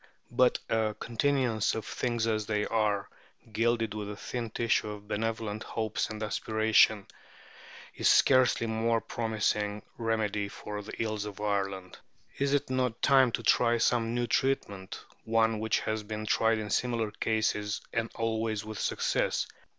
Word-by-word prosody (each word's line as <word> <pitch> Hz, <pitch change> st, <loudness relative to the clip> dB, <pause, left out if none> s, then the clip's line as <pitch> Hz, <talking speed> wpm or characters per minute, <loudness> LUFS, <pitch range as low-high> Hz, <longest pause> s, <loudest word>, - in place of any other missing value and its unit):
But 125 Hz, +1 st, +4 dB
a 110 Hz, -1 st, 0 dB
continuance 120 Hz, -2 st, +1 dB
of 110 Hz, -, -4 dB
"things 120 Hz, -2 st, -1 dB
as 110 Hz, -2 st, -1 dB
they 105 Hz, -1 st, 0 dB
are," 105 Hz, -3 st, 0 dB, 0.5 s
gilded 115 Hz, -1 st, +1 dB
with 105 Hz, -1 st, -5 dB
a 105 Hz, -, -5 dB
thin 115 Hz, +2 st, -5 dB
tissue 115 Hz, -1 st, 0 dB
of 105 Hz, -1 st, -8 dB
benevolent 110 Hz, 0 st, -2 dB
hopes 110 Hz, -2 st, -2 dB
and 110 Hz, 0 st, -5 dB
aspirations, 110 Hz, -1 st, +3 dB, 0.9 s
is -, -, +2 dB
scarcely 130 Hz, -3 st, +5 dB
a -, -, -3 dB
more 115 Hz, +1 st, +1 dB
promising 105 Hz, -2 st, -1 dB, 0.2 s
remedy 110 Hz, -3 st, 0 dB
for 105 Hz, +1 st, -7 dB
the 105 Hz, -, -9 dB
ills 110 Hz, -2 st, -2 dB
of 105 Hz, -1 st, -8 dB
Ireland. 100 Hz, -3 st, -2 dB, 0.4 s
Is 140 Hz, 0 st, +1 dB
it 140 Hz, -, -1 dB
not 125 Hz, -3 st, -1 dB
time 135 Hz, -3 st, +5 dB
to 115 Hz, -, -2 dB
try 120 Hz, +1 st, +4 dB
some 115 Hz, 0 st, +1 dB
new 120 Hz, 0 st, +1 dB
treatment 100 Hz, -7 st, -1 dB, 0.2 s
one 110 Hz, -1 st, +2 dB
which 110 Hz, 0 st, +1 dB
has 110 Hz, 0 st, -2 dB
been 110 Hz, +1 st, -5 dB
tried 115 Hz, +1 st, +2 dB
in 105 Hz, -2 st, -5 dB
similar 115 Hz, -3 st, 0 dB
cases, 105 Hz, -2 st, -1 dB
and 115 Hz, 0 st, -1 dB
always 110 Hz, -2 st, -1 dB
with 110 Hz, -1 st, -6 dB
success? -, -, 0 dB
110 Hz, 150 wpm, -29 LUFS, 105-115 Hz, 0.9 s, scarcely